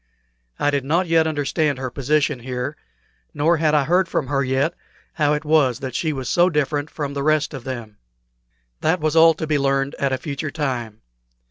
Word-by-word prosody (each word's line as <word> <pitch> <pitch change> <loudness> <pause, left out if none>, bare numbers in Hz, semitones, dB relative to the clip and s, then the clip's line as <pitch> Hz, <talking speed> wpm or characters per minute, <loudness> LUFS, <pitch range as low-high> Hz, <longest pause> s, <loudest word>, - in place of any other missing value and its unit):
I 145 - +1
did 140 -2 0
not 165 +7 +1
yet 165 -1 +3
understand 145 -1 0
her 130 -1 -4
position 140 +1 0
here, 125 +3 -4 0.6
nor 160 +3 +3
had 155 -1 +2
I 145 - +4
heard 180 +5 +2
from 135 - -2
her 140 -1 +1
yet 135 +4 0 0.4
how 150 -2 +2
it 150 +1 -2
was 145 -6 +3
that 130 -2 -5
she 160 - -1
was 135 -4 -5
so 175 +1 +3
different 150 -2 -1
from 145 -2 -4
the 140 - -3
rest 155 0 +1
of 135 -4 -8
them. 120 -5 -6 0.8
That 160 +3 +1
was 155 0 0
all 165 0 +7
to 160 - -4
be 150 -2 +1
learned 135 0 0
at 140 -1 +1
a 130 - 0
future 145 +1 -4
time. 125 -8 -4
145 Hz, 200 wpm, -21 LUFS, 135-155 Hz, 0.8 s, all